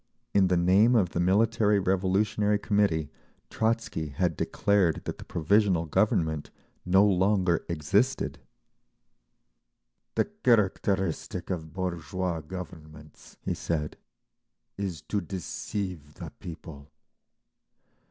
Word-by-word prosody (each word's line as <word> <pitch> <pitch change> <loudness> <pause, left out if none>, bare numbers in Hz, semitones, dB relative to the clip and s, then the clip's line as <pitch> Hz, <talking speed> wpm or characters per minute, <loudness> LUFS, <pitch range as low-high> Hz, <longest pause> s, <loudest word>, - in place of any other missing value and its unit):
In 95 -2 +4
the 90 -1 +2
name 95 +8 +4
of 100 -7 +3
the 85 - -3
Military 105 +3 +3
Revolutionary 100 +3 +1
Committee 100 -8 +1 0.4
Trotzky 110 -8 -1
had 85 +3 -1
declared 95 -2 +1
that - - -5
the - - -8
Provisional 90 +1 +2
Government 80 -4 +1 0.4
no 95 +3 +5
longer 95 -3 +2
existed. 100 - 0 1.8
"The - - +2
characteristic 100 - 0
of 80 -3 -4
bourgeois 90 -1 -3
governments," 75 -3 -10
he - - -1
said, 75 -2 -3 0.8
"is 90 -7 -4
to 105 +4 -2
deceive 90 -3 -5
the 85 -5 -8
people. 80 -5 -9
95 Hz, 100 wpm, -28 LUFS, 80-100 Hz, 1.8 s, no